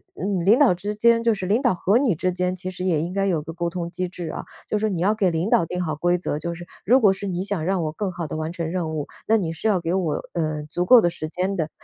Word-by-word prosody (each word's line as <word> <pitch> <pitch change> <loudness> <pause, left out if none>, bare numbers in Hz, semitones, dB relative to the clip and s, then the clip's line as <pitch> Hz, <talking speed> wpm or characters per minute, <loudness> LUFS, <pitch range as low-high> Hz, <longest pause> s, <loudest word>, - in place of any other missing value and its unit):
嗯， 190 -2 -2
领 215 +5 +6
导 275 -8 +5
之 205 +4 -4
间 230 +2 +4
就 230 -1 +3
是 195 -3 -4
领 210 +7 +2
导 245 -8 +2
和 195 +5 +2
你 245 -8 +2
之 185 +4 0
间 180 0 -1
其 185 0 -4
实 180 0 -5
也 165 -5 +2
应 170 +2 -3
该 195 +1 0
有 175 -6 +1
个 155 - -7
沟 170 +1 -2
通 170 -1 -5
机 185 +1 -2
制 175 -2 -6
啊， - - -6 0.2
就 215 - +1
是 215 +1 0
你 180 -4 -2
要 200 +4 +3
给 205 -4 +2
领 170 +4 -1
导 170 - +4
定 180 +2 -3
好 155 -3 -3
规 175 +3 +2
则， 160 -4 -3
就 170 +1 -4
是 175 +1 -9 0.2
如 255 +6 +5
果 205 -4 +6
是 195 +1 -4
你 180 -1 -2
想 195 -5 -1
让 185 -1 0
我 155 - -2
更 195 +5 -3
好 170 -1 -4
地 155 - -5
完 155 +1 -3
成 165 -2 -3
任 170 -3 -2
务， 150 -2 -3 0.2
那 225 - +4
你 180 -7 0
是 165 +7 -3
要 195 -5 +2
给 170 +1 -1
我， 180 -5 0 0.2
呃， 155 -3 -2
足 175 +3 -1
够 245 +4 +8
的 175 - +2
时 155 -2 -5
间 170 +3 -6
的。 160 -4 -1
180 Hz, 330 characters per minute, -23 LUFS, 165-200 Hz, 0.2 s, 够